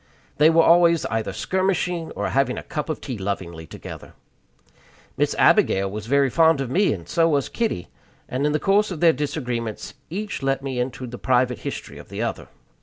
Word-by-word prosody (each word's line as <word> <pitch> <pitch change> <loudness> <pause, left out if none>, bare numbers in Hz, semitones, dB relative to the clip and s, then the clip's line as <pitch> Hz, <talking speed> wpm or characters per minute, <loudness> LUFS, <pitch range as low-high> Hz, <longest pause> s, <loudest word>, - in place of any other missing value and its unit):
They 150 +2 +6
were 165 0 +5
always 170 -1 +5
either 115 -1 -1
skirmishing 180 -3 -1
or - - -2
having 135 -2 +1
a - - -5
cup 150 +1 -4
of 155 - -3
tea 125 -6 -5
lovingly 85 -5 -4
together. - - -10 1.0
Miss - - 0
Abigail 95 0 +4
was 105 +1 -6
very 140 0 +3
fond 160 0 +4
of 135 -3 -3
me, 195 +7 +3
and 85 -5 -5
so 165 -1 +2
was 145 -3 +1
Kitty; 225 - -2 0.4
and 130 +2 -2
in - - +1
the 150 - +1
course 205 +2 +2
of 180 -5 -5
their 165 -1 +5
disagreements 125 -6 -4 0.2
each 205 +3 -4
let 135 0 0
me 130 -2 -3
into 130 +1 -3
the 120 0 -8
private 125 -1 +1
history - - -6
of - - -13
the - - -7
other. - - -4
140 Hz, 190 wpm, -23 LUFS, 120-165 Hz, 1.0 s, They